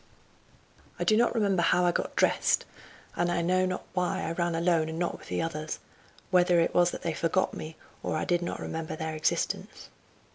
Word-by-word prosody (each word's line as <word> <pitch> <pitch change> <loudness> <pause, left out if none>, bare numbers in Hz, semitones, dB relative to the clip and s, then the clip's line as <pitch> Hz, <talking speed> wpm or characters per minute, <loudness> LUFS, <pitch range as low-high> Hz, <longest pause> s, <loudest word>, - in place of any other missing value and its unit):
I - - -1
do 215 - +4
not 240 +2 +3
remember 200 -5 +2
how 175 +1 +3
I 175 - +4
got - - -3
dressed, - - +2 0.5
and 175 - +1 0.2
know 185 +1 +3
not 185 - -4
why 185 +1 0
I 165 - -2
ran 170 0 -1
alone 165 -1 +2
and 160 - -5
not 175 0 -2
with - - -14
the - - -1
others; 155 -1 -4 0.5
whether 180 -1 +5
it 165 - +2
was 175 0 +4
that - - -7
they 165 - -1
forgot 170 +4 0
me, 155 +1 -7 0.3
or - - -2
I - - -1
did 175 0 +1
not 175 - -3
remember 160 -1 -4
their 160 0 -4
existence. 155 0 -2
175 Hz, 195 wpm, -28 LUFS, 160-180 Hz, 0.5 s, whether